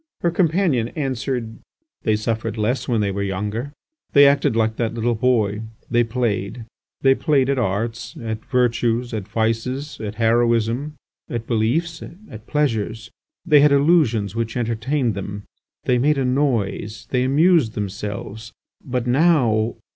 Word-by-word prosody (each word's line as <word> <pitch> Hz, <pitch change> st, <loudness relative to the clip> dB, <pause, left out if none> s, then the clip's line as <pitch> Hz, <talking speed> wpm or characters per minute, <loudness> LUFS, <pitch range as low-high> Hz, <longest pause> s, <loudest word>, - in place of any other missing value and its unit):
Her 170 Hz, -, +1 dB
companion 165 Hz, -, +1 dB
answered: 130 Hz, -5 st, -3 dB, 0.4 s
"They 110 Hz, -, +1 dB
suffered 110 Hz, +1 st, -2 dB
less 120 Hz, +4 st, -1 dB
when 115 Hz, -4 st, +1 dB
they 100 Hz, -1 st, 0 dB
were 100 Hz, +1 st, -3 dB
younger. 105 Hz, +7 st, -3 dB, 0.4 s
They 145 Hz, 0 st, +8 dB
acted 140 Hz, -4 st, +3 dB
like 110 Hz, -1 st, +1 dB
that 115 Hz, -1 st, -1 dB
little 120 Hz, +1 st, 0 dB
boy: 110 Hz, -3 st, +1 dB, 0.3 s
they 120 Hz, 0 st, +4 dB
played; 115 Hz, -1 st, -2 dB, 0.4 s
they 135 Hz, 0 st, +5 dB
played 140 Hz, -2 st, +2 dB
at 135 Hz, -, 0 dB
arts, 115 Hz, +2 st, -2 dB
at 110 Hz, -1 st, -5 dB
virtues, 120 Hz, -2 st, 0 dB
at 105 Hz, -3 st, -4 dB
vices, 115 Hz, +6 st, -2 dB
at 105 Hz, -1 st, -5 dB
heroism, 120 Hz, +4 st, +1 dB, 0.3 s
at 115 Hz, -1 st, -4 dB
beliefs, 135 Hz, +10 st, 0 dB, 0.3 s
at 110 Hz, 0 st, -11 dB
pleasures; 115 Hz, -6 st, -1 dB, 0.3 s
they 150 Hz, -1 st, +6 dB
had 145 Hz, 0 st, +5 dB
illusions 140 Hz, -, +3 dB
which 115 Hz, 0 st, -2 dB
entertained 120 Hz, +2 st, 0 dB
them; 100 Hz, +1 st, -6 dB, 0.4 s
they 125 Hz, -1 st, +2 dB
made 145 Hz, +3 st, +2 dB
a 135 Hz, -, 0 dB
noise; 115 Hz, -5 st, -1 dB
they 125 Hz, -, +2 dB
amused 145 Hz, -, +3 dB
themselves. 105 Hz, +2 st, -5 dB, 0.3 s
But 125 Hz, -2 st, -2 dB
now. 125 Hz, -6 st, +2 dB
120 Hz, 140 wpm, -21 LUFS, 110-135 Hz, 0.4 s, They